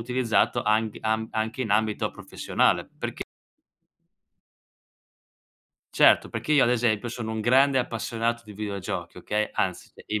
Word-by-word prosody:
utilizzato 120 Hz, -1 st, +1 dB
anc 110 Hz, 0 st, +1 dB
am 110 Hz, 0 st, -1 dB
anche 110 Hz, +3 st, -2 dB
in 110 Hz, -, -4 dB
ambito 110 Hz, 0 st, +1 dB
professionale, -, -, 0 dB
perc -, -, -5 dB, 2.7 s
Certo, -, -, +5 dB
perché 155 Hz, -, -2 dB
io 145 Hz, -, +5 dB
ad 120 Hz, -, +2 dB
esempio 115 Hz, -1 st, +1 dB
sono 115 Hz, -2 st, -5 dB
un 110 Hz, -1 st, -3 dB
grande 135 Hz, +3 st, +4 dB
appassionato 115 Hz, 0 st, -2 dB
di 105 Hz, -, -11 dB
videogiochi, 100 Hz, -3 st, -5 dB
okay, 105 Hz, 0 st, -2 dB
anzi, -, -, -2 dB, 0.2 s
i 105 Hz, 0 st, -1 dB
110 Hz, 130 wpm, -26 LUFS, 110-120 Hz, 2.7 s, Certo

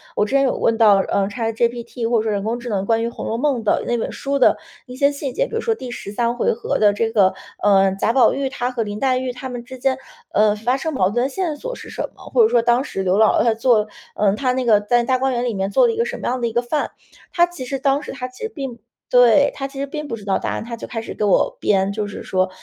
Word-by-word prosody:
我 -, -, +2 dB
之 210 Hz, +6 st, -1 dB
前 275 Hz, -, +4 dB
有 265 Hz, -, +1 dB
问 225 Hz, -, +1 dB
到 215 Hz, -3 st, +6 dB
呃 195 Hz, 0 st, 0 dB
ChatGPT， 235 Hz, +1 st, -2 dB
或 235 Hz, -, +3 dB
者 -, -, -1 dB
说 -, -, 0 dB
人 200 Hz, -1 st, -1 dB
工 230 Hz, +3 st, -2 dB
智 240 Hz, -, -7 dB
能 195 Hz, -3 st, -1 dB
关 225 Hz, +1 st, +2 dB
于 -, -, 0 dB
《红 -, -, -7 dB
楼 225 Hz, -, -2 dB
梦》 275 Hz, -2 st, +1 dB
的 210 Hz, -, +1 dB
那 240 Hz, -, +1 dB
本 225 Hz, -, -3 dB
书 280 Hz, 0 st, -2 dB
的 255 Hz, -, +5 dB, 0.3 s
一 250 Hz, -1 st, -10 dB
些 280 Hz, +2 st, +3 dB
细 280 Hz, -2 st, -5 dB
节。 -, -, 0 dB
比 460 Hz, -, -7 dB
如 455 Hz, -, -1 dB
说 460 Hz, -, +1 dB
第 260 Hz, -, -8 dB
13 235 Hz, +1 st, -2 dB
回 -, -, +2 dB
合 235 Hz, -, -2 dB
的 210 Hz, -1 st, +4 dB
这 225 Hz, +2 st, 0 dB
个， 200 Hz, -4 st, +3 dB, 0.3 s
呃， 195 Hz, -2 st, +4 dB
贾 230 Hz, -, +1 dB
宝 260 Hz, -, +5 dB
玉 275 Hz, 0 st, -1 dB
他 245 Hz, -2 st, -2 dB
和 240 Hz, -2 st, -1 dB
林 205 Hz, 0 st, -5 dB
黛 260 Hz, 0 st, +2 dB
玉 255 Hz, 0 st, -2 dB
他 260 Hz, +1 st, -7 dB
们 245 Hz, -1 st, -6 dB
之 260 Hz, +2 st, -10 dB
间， 260 Hz, 0 st, +1 dB, 0.3 s
呃， 210 Hz, 0 st, +3 dB
发 240 Hz, +5 st, 0 dB
生 320 Hz, +3 st, -3 dB
矛 190 Hz, -7 st, +2 dB
盾 240 Hz, +4 st, 0 dB
的 265 Hz, -, 0 dB
线 335 Hz, 0 st, -2 dB
索 -, -, -5 dB
是 -, -, -11 dB
什 -, -, -4 dB
么？ -, -, -15 dB
或 475 Hz, -, +5 dB
者 440 Hz, -, +4 dB
说， 235 Hz, -, +3 dB
当 240 Hz, +2 st, +2 dB
时 195 Hz, -, -4 dB
刘 185 Hz, +1 st, +2 dB
姥 220 Hz, 0 st, +4 dB
姥 -, -, +3 dB
她 230 Hz, -, +3 dB
做， 225 Hz, -2 st, +2 dB, 0.3 s
呃 205 Hz, -2 st, +2 dB
她 255 Hz, +2 st, 0 dB
那 260 Hz, 0 st, -1 dB
个 220 Hz, -4 st, +4 dB
在 240 Hz, +4 st, +1 dB
大 255 Hz, +2 st, +1 dB
观 265 Hz, 0 st, 0 dB
园 240 Hz, 0 st, -1 dB
里 240 Hz, -, -1 dB
面 195 Hz, -1 st, -2 dB
做 -, -, +4 dB
了 460 Hz, -, 0 dB
一 -, -, -7 dB
个 465 Hz, -, +1 dB
什 480 Hz, +1 st, -4 dB
么 -, -, -4 dB
样 255 Hz, +1 st, -1 dB
的 235 Hz, -, +1 dB
一 230 Hz, -, -5 dB
个 240 Hz, -, +2 dB
饭？ 265 Hz, +5 st, -2 dB, 0.4 s
它 345 Hz, -, +5 dB
其 350 Hz, -7 st, -8 dB
实 270 Hz, +2 st, -3 dB
当 275 Hz, +1 st, +1 dB
时 -, -, -7 dB
它 255 Hz, -1 st, -5 dB
其 255 Hz, +8 st, -12 dB
实 445 Hz, -, -2 dB
并 270 Hz, -, -6 dB, 0.3 s
对， 245 Hz, +3 st, +5 dB
它 275 Hz, -, -4 dB
其 275 Hz, 0 st, -10 dB
实 280 Hz, -, -1 dB
并 300 Hz, +1 st, -6 dB
不 230 Hz, -, -3 dB
知 210 Hz, -, -12 dB
道 195 Hz, -, +1 dB
答 -, -, -3 dB
案。 -, -, -3 dB
它 235 Hz, -, -5 dB
就 -, -, -8 dB
开 225 Hz, -, -4 dB
始 225 Hz, -, -7 dB
给 -, -, -4 dB
我 200 Hz, -3 st, +2 dB
编， 195 Hz, -1 st, +1 dB
就 210 Hz, 0 st, -3 dB
是 205 Hz, -, -8 dB
说 185 Hz, 0 st, 0 dB
240 Hz, 340 characters per minute, -20 LUFS, 215-270 Hz, 0.4 s, 到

